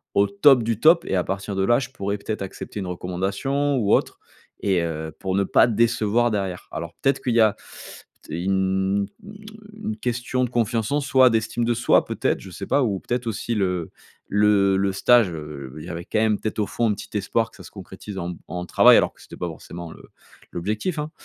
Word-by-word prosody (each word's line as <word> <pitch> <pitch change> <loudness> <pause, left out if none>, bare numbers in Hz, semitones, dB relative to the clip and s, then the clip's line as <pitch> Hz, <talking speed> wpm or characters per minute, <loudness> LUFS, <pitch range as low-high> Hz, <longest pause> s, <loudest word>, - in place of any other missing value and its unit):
au 100 0 +4
top 115 +6 +5
du 115 -1 -1
top 165 +5 +5
et - - -1
à 90 - +2
partir 100 +1 -4
de 95 - +1
là, 120 +4 +4
je 130 - -5
pourrais, 100 +1 -3
peut-être, 105 +1 -5
accepter 95 +2 -6
une 95 - -4
recommandation 95 +11 -1
ou 105 -5 +2
autre» - - +1 0.4
et 95 -4 +1
heu, 80 -1 -4
pour 95 -1 -2
ne 100 - +2
pas - - +4
décevoir 115 0 +2
derrière. 95 -3 -3
Alors, 85 +1 -6
peut-être, 135 -1 +1
qu'il 120 -2 -1
y 115 - +5
a 110 -2 +4 0.7
t - - -10
une 95 +1 +1 0.7
une 215 0 -5
question 125 +1 -1
de - - -6
confiance 115 -1 0
en 145 - +2
soi, 130 -2 +5
d'estime 115 +1 0
de 120 - +2
soi, 120 +1 +3
peut-être, - - -1
je 95 - -11
sais 100 +2 -7
pas 145 - +2
ou, 100 -5 -1
peut-être, 120 0 -3
aussi 115 +1 -2
le 90 -5 -1 0.4
le 100 -1 +3
le 95 0 +1
stage, 120 +1 +4
heu, 75 -4 -8
il - - -9
y - - -8
avait, 85 +1 -6
quand 110 - -1
même, 110 -2 +2
peut-être, 110 0 -4
au 105 - +2
fond, 115 -1 0
un - - +2
petit 105 - -6
espoir 110 +3 -1
que - - -18
ça - - -12
se - - -11
concrétise 95 +1 -9
en 85 - -4
m 85 - -9
en 90 0 -5
travail, - - +6
alors - - +2
que - - -21
c'était - - -12
pas 90 - -3
forcément 85 +1 -9
le - - -14 0.5
l'objectif, 105 - -2
hein. 150 +1 -4
105 Hz, 225 wpm, -23 LUFS, 95-120 Hz, 0.7 s, travail